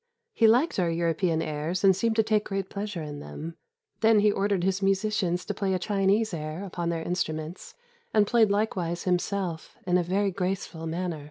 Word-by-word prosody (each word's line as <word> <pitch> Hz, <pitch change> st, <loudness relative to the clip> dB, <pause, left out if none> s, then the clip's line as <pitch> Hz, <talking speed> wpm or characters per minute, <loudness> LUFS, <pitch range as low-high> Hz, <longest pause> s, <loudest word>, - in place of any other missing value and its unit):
He 225 Hz, -, +4 dB
liked 245 Hz, -, +3 dB
our 175 Hz, -2 st, +2 dB
European 165 Hz, 0 st, 0 dB
airs 155 Hz, +5 st, -3 dB
and 190 Hz, -1 st, +6 dB
seemed 225 Hz, +4 st, 0 dB
to 220 Hz, -, +4 dB
take 215 Hz, -1 st, +1 dB
great 195 Hz, -1 st, -3 dB
pleasure 200 Hz, -4 st, -4 dB
in 145 Hz, -1 st, -6 dB
them. 165 Hz, +3 st, -7 dB, 0.4 s
Then 220 Hz, -2 st, +5 dB
he 210 Hz, 0 st, +4 dB
ordered 200 Hz, -2 st, 0 dB
his 190 Hz, +1 st, 0 dB
musicians 195 Hz, -2 st, +1 dB
to 205 Hz, -, -2 dB
play 190 Hz, -1 st, 0 dB
a -, -, +2 dB
Chinese 200 Hz, +2 st, +1 dB
air 155 Hz, +3 st, -4 dB
upon 175 Hz, -3 st, -3 dB
their 165 Hz, -1 st, -2 dB
instruments, 160 Hz, -1 st, -4 dB, 0.4 s
and 210 Hz, -1 st, +4 dB
played 225 Hz, -1 st, +4 dB
likewise 185 Hz, -5 st, -1 dB
himself 180 Hz, -2 st, -2 dB
in 180 Hz, 0 st, +3 dB
a -, -, +1 dB
very 195 Hz, +3 st, +1 dB
graceful 180 Hz, -3 st, -3 dB
manner. 170 Hz, 0 st, -3 dB
185 Hz, 185 wpm, -27 LUFS, 170-205 Hz, 0.4 s, and